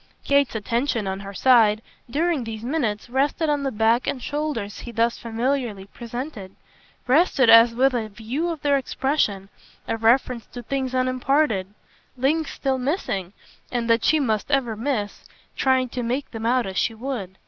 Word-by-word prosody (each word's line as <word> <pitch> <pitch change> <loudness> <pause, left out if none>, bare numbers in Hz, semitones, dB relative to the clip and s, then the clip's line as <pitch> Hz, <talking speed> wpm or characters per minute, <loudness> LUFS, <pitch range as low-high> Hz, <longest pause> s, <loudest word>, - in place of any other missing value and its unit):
Kate's 280 -3 +2
attention, 230 +1 -1
on 190 0 -3
her 200 0 -8
side, 220 0 +4 0.3
during 310 +1 0
these 225 -1 -6
minutes, 240 -6 -2
rested 280 +5 0
on 290 -1 0
the 275 -1 -1
back 225 +2 +2
and 265 - -1
shoulders 275 -7 -3
he 240 - -8
thus 230 +1 0
familiarly 230 -3 -2
presented 235 -2 -7 0.5
rested 265 -3 +4
as 230 +1 +7
with 265 +2 +3
a 225 -3 -2
view 230 +11 -3
of 330 -2 -4
their 285 -1 +3
expression, 260 -7 -1 0.4
a - - 0
reference 235 +1 +2
to 245 - -9
things 260 +1 -2
unimparted, 255 -4 +1 0.5
links 295 +5 +1
still 265 -1 -1
missing 250 - -2 0.4
and 240 -2 -1
that 230 -1 +3
she 315 - +4
must 220 -6 -1
ever 265 -6 +1
miss, 220 -3 -3 0.3
try 260 -1 +2
to 250 0 -5
make 250 +4 -2
them 225 -1 -3
out 250 0 +2
as 190 -1 -5
she 225 - 0
would. 220 -6 -5
245 Hz, 165 wpm, -23 LUFS, 220-275 Hz, 0.5 s, as